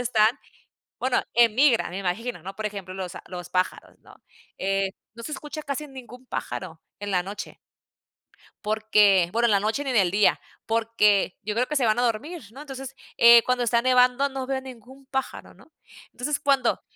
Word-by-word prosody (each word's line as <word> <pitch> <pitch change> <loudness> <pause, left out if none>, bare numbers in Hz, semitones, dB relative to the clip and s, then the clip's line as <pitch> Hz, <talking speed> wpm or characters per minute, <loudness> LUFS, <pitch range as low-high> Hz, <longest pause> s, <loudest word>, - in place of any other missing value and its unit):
están, 225 -3 +3 0.7
bueno, 255 0 +1
emigran 235 0 +4
me 185 - -5
imagino, 195 +1 -3
¿no? 195 +2 -7
Por 215 - -3
ejemplo, 195 -3 -6
los 185 -2 -6
a - - -9
los 180 -1 -7
pájaros, 185 0 -2
¿no?, - - -18 0.4
eh, 195 0 0 0.2
no 235 - -10
se 305 - -6
escucha 300 +2 -6
casi 285 +1 -4
ningún 255 -1 -12
pájaro 165 -9 -6 0.2
en 205 0 -4
la 180 - +2
noche 200 +3 -8 1.1
porque, 210 -4 +3
bueno, 235 +1 +2
en 225 - +2
la 200 - +4
noche 220 +7 -1
ni 270 - -2
en 245 - +2
el 185 -4 +3
día, 205 +1 +3 0.3
porque 220 -4 +2
yo 210 +1 -2
creo 250 +2 +1
que 300 - -3
se 265 -5 +2
van 215 +2 +2
a - - +2
dormir, 255 +9 -2
¿no? 270 - -11
entonces, 270 -2 -8 0.2
eh, 235 0 +8
cuando 250 -1 0
está 235 0 +2
nevando 255 +2 +3
no 265 -1 -5
veo 265 -1 -2
ningún 260 +1 -13
pájaro, 265 0 -4
¿no? 320 - -21 0.4
Entonces, 285 +3 -2
cuando 270 -4 +1
235 Hz, 190 wpm, -25 LUFS, 205-265 Hz, 1.1 s, eh